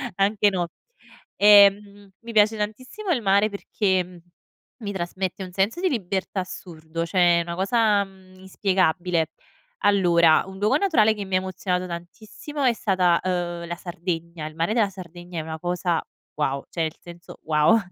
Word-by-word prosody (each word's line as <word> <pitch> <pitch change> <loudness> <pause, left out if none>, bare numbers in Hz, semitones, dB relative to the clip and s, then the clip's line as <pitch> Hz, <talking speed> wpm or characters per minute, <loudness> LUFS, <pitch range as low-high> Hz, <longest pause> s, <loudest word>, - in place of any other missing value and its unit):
anche 205 +1 +3
no. 175 -3 -2 0.7
Ehm, 200 0 +5
mi 230 0 -9
piace 215 0 +4
tantissimo 255 - -5
il 260 -8 +1
mare 200 +1 +3
perché 185 -3 -2 0.6
mi 205 -4 -5
trasmette 185 +1 -4
un 185 - -9
senso 195 - 0
di 375 - +2
libertà 195 - -2
assurdo, 165 -2 -6
cioè 175 0 +3
è - - +1
una 170 0 -5
cosa, 205 +2 +2
mhmm, 190 -1 -19
inspiegabile. 180 -3 0 0.5
Allora, 170 -5 +4
un 190 0 -10
luogo 215 +7 +3
naturale 230 - +3
che 205 -2 -6
mi 190 -1 -2
ha - - +4
emozionato 185 -1 -3
tantissimo 205 - -7
è 250 - +4
stata, 185 -6 +2
ehm, 175 -2 -3
la 175 - -4
Sardegna. 170 -2 -5
Il 155 - -11
mare 165 +6 0
della 220 -3 +2
Sardegna 175 -2 -9
è - - -2
una 160 0 -6
cosa 175 0 -1 0.4
wow 140 -2 -1
cioè 165 - -2
nel 160 0 -3
senso 175 0 -12
wow 155 +8 +4
185 Hz, 160 wpm, -24 LUFS, 170-205 Hz, 0.7 s, Ehm